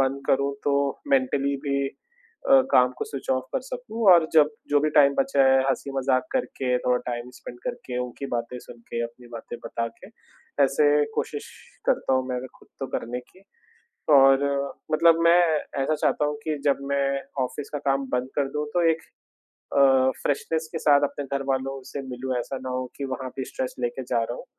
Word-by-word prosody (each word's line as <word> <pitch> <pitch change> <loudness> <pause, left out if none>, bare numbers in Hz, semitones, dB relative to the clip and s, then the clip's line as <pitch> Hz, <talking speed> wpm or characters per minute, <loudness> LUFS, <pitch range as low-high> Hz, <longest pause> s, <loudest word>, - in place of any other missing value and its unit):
बंद 135 +1 +1
करूँ, 140 +1 +2
तो 140 -1 +1
मेंटली 140 +1 +1
भी 140 0 +1 0.6
अ, 270 -1 +8
काम 125 0 +5
को - - -2
स्विच 140 - -8
ऑफ़ 130 0 +1
कर - - 0
सकूँ 245 -3 -5
और 165 -2 +5
जब 150 -2 +6 0.2
जो 145 0 +4
भी 155 0 +1
टाइम 140 -2 +5
बचा 270 - +2
है, 135 0 +5
हँसी-मज़ाक 135 0 0
करके, 130 - -1
थोड़ा 125 0 +1
टाइम 120 0 -4
स्पेंड 120 - -10
करके, 240 - -4
उनकी 125 +3 -7
बातें 120 0 -3
सुन 120 - -13
के, 120 - -2
अपनी 120 +1 -10
बातें 120 +1 -7
बता 115 0 -2
के, - - -12 0.6
ऐसे 140 +2 +2 0.3
कोशिश 445 +2 -3 0.4
करता - - +1
हूँ 130 0 0
मैं 125 - -2
अगर 130 +1 -4
खुद - - -21
तो - - -2
करने 125 +2 -5
की 185 +9 -22 0.7
और 135 -1 +7 0.5
मतलब 165 +1 +5
मैं 170 +1 +6 0.4
ऐसा 155 +3 +1
चाहता 150 - +1
हूँ 150 0 -1
कि 155 -2 -2
जब 140 - +3
मैं 140 0 +1 0.2
ऑफ़िस 140 +3 -5
का - - 0
काम 135 0 +1
बंद 125 0 0
कर 140 -2 +1
दूँ 150 0 -1
तो 175 -2 +3
एक 160 - -4 0.8
अ, 130 -1 +5
फ़्रेशनेस 160 +3 -1
के 160 - -4
साथ 145 -1 +5
अपने 145 0 -6
घरवालों 135 0 -2
से 140 - -4
मिलूँ। 125 +1 -3
ऐसा 135 +2 -4
ना 130 - -4
हो 130 0 -2
कि 140 - -3
वहाँ 130 0 -5
पे 130 - -3
स्ट्रेस 130 - -4
लेके 125 +2 -2
जा 120 - 0
रहा 120 +2 -4
हूँ। - - -10
135 Hz, 195 wpm, -25 LUFS, 130-150 Hz, 0.8 s, अ